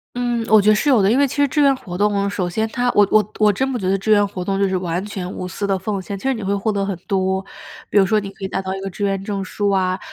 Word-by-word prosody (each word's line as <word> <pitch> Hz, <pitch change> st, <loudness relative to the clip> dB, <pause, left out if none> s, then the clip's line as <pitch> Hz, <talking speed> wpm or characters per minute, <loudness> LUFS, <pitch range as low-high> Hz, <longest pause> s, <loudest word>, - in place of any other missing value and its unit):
嗯， 240 Hz, -2 st, -1 dB
我 215 Hz, -1 st, +6 dB
觉 210 Hz, -, +3 dB
得 215 Hz, -, +6 dB
是 250 Hz, +7 st, +1 dB
有 250 Hz, -6 st, +5 dB
的。 195 Hz, +2 st, +3 dB
因 250 Hz, -, +3 dB
为 280 Hz, -, +4 dB
其 275 Hz, -, -7 dB
实 285 Hz, 0 st, +4 dB
志 295 Hz, -, -2 dB
愿 275 Hz, -1 st, +4 dB
活 180 Hz, -8 st, -8 dB
动， 200 Hz, -1 st, +1 dB
首 185 Hz, -3 st, -2 dB
先 220 Hz, +5 st, -1 dB
它 245 Hz, +2 st, 0 dB
我 205 Hz, -1 st, +5 dB
我 215 Hz, -1 st, +3 dB
我 210 Hz, -1 st, +5 dB
真 265 Hz, +7 st, -1 dB
不 245 Hz, -, -2 dB
觉 185 Hz, -, -1 dB
得 195 Hz, -, +2 dB
志 215 Hz, +3 st, -1 dB
愿 205 Hz, -1 st, +5 dB
活 185 Hz, -2 st, -6 dB
动 195 Hz, 0 st, -1 dB
就 195 Hz, -1 st, +2 dB
是 185 Hz, -, 0 dB
完 180 Hz, 0 st, -2 dB
全 190 Hz, -3 st, -5 dB
无 180 Hz, -, -5 dB
私 200 Hz, +2 st, -4 dB
地 195 Hz, -1 st, 0 dB
奉 200 Hz, +1 st, -3 dB
献， 200 Hz, +2 st, -6 dB
其 195 Hz, -, -10 dB
实 270 Hz, -, +1 dB
你 220 Hz, -, -6 dB
会 200 Hz, +1 st, 0 dB
获 205 Hz, +2 st, -1 dB
得 200 Hz, -1 st, -1 dB
很 195 Hz, -2 st, -2 dB
多。 190 Hz, 0 st, 0 dB, 0.5 s
比 -, -, +1 dB
如 195 Hz, -, +6 dB
说 215 Hz, +2 st, +2 dB
你 195 Hz, -1 st, -6 dB
可 195 Hz, 0 st, -8 dB
以 -, -, -1 dB
拿 190 Hz, -, -2 dB
到 190 Hz, 0 st, -4 dB
一 195 Hz, -, -6 dB
个 195 Hz, -, -4 dB
志 205 Hz, -, -5 dB
愿 195 Hz, -1 st, 0 dB
证 200 Hz, -1 st, -3 dB
书 200 Hz, +2 st, -1 dB
啊， 185 Hz, -1 st, 0 dB
200 Hz, 360 characters per minute, -20 LUFS, 190-215 Hz, 0.5 s, 我